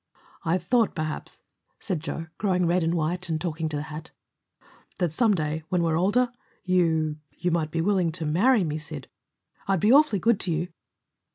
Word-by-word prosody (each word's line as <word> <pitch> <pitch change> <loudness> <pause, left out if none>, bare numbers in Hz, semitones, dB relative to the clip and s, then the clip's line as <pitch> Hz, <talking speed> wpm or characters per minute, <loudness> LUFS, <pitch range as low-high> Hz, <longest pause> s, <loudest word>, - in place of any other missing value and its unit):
"I 165 +3 +2
thought, 220 +6 +1
perhaps," 155 -2 -4 0.4
said 185 -6 -2
Joe, 165 +1 -5
growing 180 -3 +2
red 175 +2 +2
and 165 +1 +1
white, 170 +2 -1
and 160 -1 0
talking 160 -1 -2
to 150 - -3
the 145 - -3
hat, 155 +1 -8 0.9
"that 175 -4 0
some 215 +4 +3
day, 155 -1 -2
when 180 -2 +1
we're 165 -1 +1
older, 215 +8 +2 0.3
you 160 -4 +2 0.2
you 180 - 0
might 160 -2 0
be 165 +1 -1
willing 185 -2 +2
to 165 -2 -3
marry 200 +9 +4
me, 155 -2 -2
Sid. 150 -3 -7 0.6
I'd 195 -2 +2
be 215 +8 +4
awfully 295 -7 +5
good 225 +2 +2
to 180 - -1
you." 170 +2 -1
170 Hz, 185 wpm, -26 LUFS, 160-190 Hz, 0.9 s, awfully